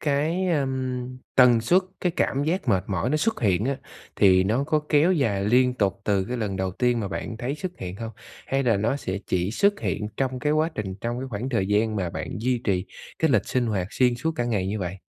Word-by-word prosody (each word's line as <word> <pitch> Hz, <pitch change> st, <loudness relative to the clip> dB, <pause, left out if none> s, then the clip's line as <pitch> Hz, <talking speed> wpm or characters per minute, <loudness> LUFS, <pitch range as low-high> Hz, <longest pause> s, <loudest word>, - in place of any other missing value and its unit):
cái, 155 Hz, +6 st, 0 dB
ờm, 130 Hz, -4 st, -2 dB, 0.2 s
tần 125 Hz, -3 st, +6 dB
suất 175 Hz, +12 st, +3 dB, 0.2 s
cái 180 Hz, -2 st, 0 dB
cảm 140 Hz, +2 st, +1 dB
giác 165 Hz, -2 st, -1 dB
mệt 95 Hz, -4 st, +2 dB
mỏi 100 Hz, +5 st, -1 dB
nó 155 Hz, -, +2 dB
xuất 220 Hz, +8 st, 0 dB
hiện 100 Hz, -1 st, +2 dB
á 135 Hz, 0 st, 0 dB, 0.4 s
thì 95 Hz, -1 st, +5 dB
nó 115 Hz, +8 st, +1 dB
có 155 Hz, 0 st, +1 dB
kéo 155 Hz, +5 st, +4 dB
dài 110 Hz, -, +1 dB
liên 125 Hz, +4 st, +3 dB
tục 100 Hz, -4 st, 0 dB
từ 100 Hz, -2 st, +1 dB
cái 125 Hz, +4 st, -4 dB
lần 105 Hz, -4 st, -2 dB
đầu 95 Hz, 0 st, -1 dB
tiên 120 Hz, +3 st, +1 dB
mà 100 Hz, -, -3 dB
bạn 110 Hz, +2 st, -5 dB
thấy 125 Hz, +4 st, -3 dB
xuất 180 Hz, +3 st, -6 dB
hiện 90 Hz, 0 st, -6 dB
hông? 115 Hz, 0 st, -5 dB, 0.4 s
Hay 135 Hz, +1 st, 0 dB
là 115 Hz, -5 st, +3 dB
nó 115 Hz, +7 st, 0 dB
sẽ 95 Hz, -7 st, -3 dB
chỉ 90 Hz, +1 st, 0 dB
xuất 200 Hz, -, +2 dB
hiện 105 Hz, -, -2 dB
trong 130 Hz, -1 st, -1 dB
cái 150 Hz, +3 st, 0 dB
quá 155 Hz, +1 st, +2 dB
trình 95 Hz, -3 st, -4 dB
trong 120 Hz, +1 st, -2 dB
cái 135 Hz, -, -5 dB
khoảng 115 Hz, +3 st, -4 dB
thời 115 Hz, -7 st, 0 dB
gian 105 Hz, +2 st, +1 dB
mà 90 Hz, -3 st, -1 dB
bạn -, -, -5 dB
duy 125 Hz, +1 st, +1 dB
trì 95 Hz, -2 st, +1 dB, 0.3 s
cái 160 Hz, -3 st, +2 dB
lịch 110 Hz, -6 st, +2 dB
sinh 125 Hz, -2 st, +1 dB
hoạt 95 Hz, -5 st, -1 dB
xuyên 125 Hz, -2 st, +2 dB
suốt 160 Hz, +7 st, -2 dB
cả 120 Hz, -, 0 dB
ngày 105 Hz, -6 st, 0 dB
như 105 Hz, +3 st, -2 dB
vậy? 95 Hz, 0 st, -4 dB
120 Hz, 240 wpm, -25 LUFS, 100-140 Hz, 0.4 s, tần